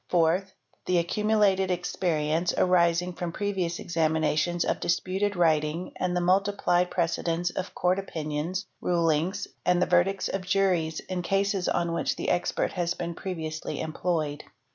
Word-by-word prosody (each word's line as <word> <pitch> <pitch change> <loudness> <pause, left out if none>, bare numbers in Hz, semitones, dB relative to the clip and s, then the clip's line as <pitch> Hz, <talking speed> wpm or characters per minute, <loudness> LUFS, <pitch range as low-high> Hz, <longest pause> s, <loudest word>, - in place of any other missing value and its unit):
Fourth. 180 +3 +2 0.3
The 180 - +3
accumulated 200 +1 +2
experience 170 -2 0
arising 180 0 +3
from 175 -1 -4
previous 185 -3 -2
exami 160 -2 0
nations 160 +3 +1
of - - 0
disputed 190 +4 0
writing 160 0 +1
and 180 -1 -1
the. - - +1
multiplied 180 -1 +2
precedents 170 0 0
of 190 +2 -5
Court 180 +1 +2
opinions, 165 +1 -3 0.2
rulings, 170 +3 +1 0.2
and 180 0 +3
the 180 - +3
verdicts 180 +2 +2
of 195 - -2
juries, 185 -4 +1
in 185 -1 -4
cases 195 +1 0
on 170 -1 0
which - - 0
the - - -1
expert 175 - 0
has 175 -1 -1
been 170 -1 -4
previously 160 -3 -5
employed. 155 -2 -2
175 Hz, 140 wpm, -27 LUFS, 165-185 Hz, 0.3 s, The